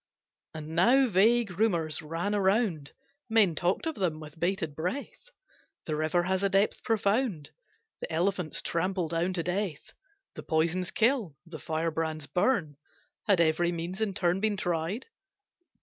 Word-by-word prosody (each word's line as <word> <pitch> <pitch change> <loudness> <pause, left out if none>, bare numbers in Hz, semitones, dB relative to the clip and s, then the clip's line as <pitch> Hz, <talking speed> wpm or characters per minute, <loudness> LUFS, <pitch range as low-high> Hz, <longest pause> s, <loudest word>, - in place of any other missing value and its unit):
And 155 -1 -7
now 240 +12 +4
vague 210 -1 +3
rumours 170 -8 +1
ran 165 +6 -3
around, 190 - +1 0.4
Men 220 -6 +4
talked 175 - 0
of 320 - -1
them 175 - -1
with 155 +1 -11
bated 170 -4 -1
breath: 260 - -5 0.6
The 155 - -2
river 155 +3 +1
has 190 +1 0
a 200 - +2
depth 195 +2 +1
profound, 210 - 0 0.5
The - - -6
elephants 175 0 -1
trample 180 0 -1
down 170 +3 0
to 170 -2 -2
death, 180 -3 -3 0.4
The - - -8
poisons 170 +3 0
kill, 225 - +1
the 165 -2 -9
firebrands 160 -1 -2
burn. 170 - 0 0.5
Had 200 -4 +4
every 170 +2 +2
means 175 +4 -5
in 205 -3 -1
turn 180 -1 +1
been 210 0 0
tried? 175 +6 -2
180 Hz, 145 wpm, -29 LUFS, 160-205 Hz, 0.6 s, now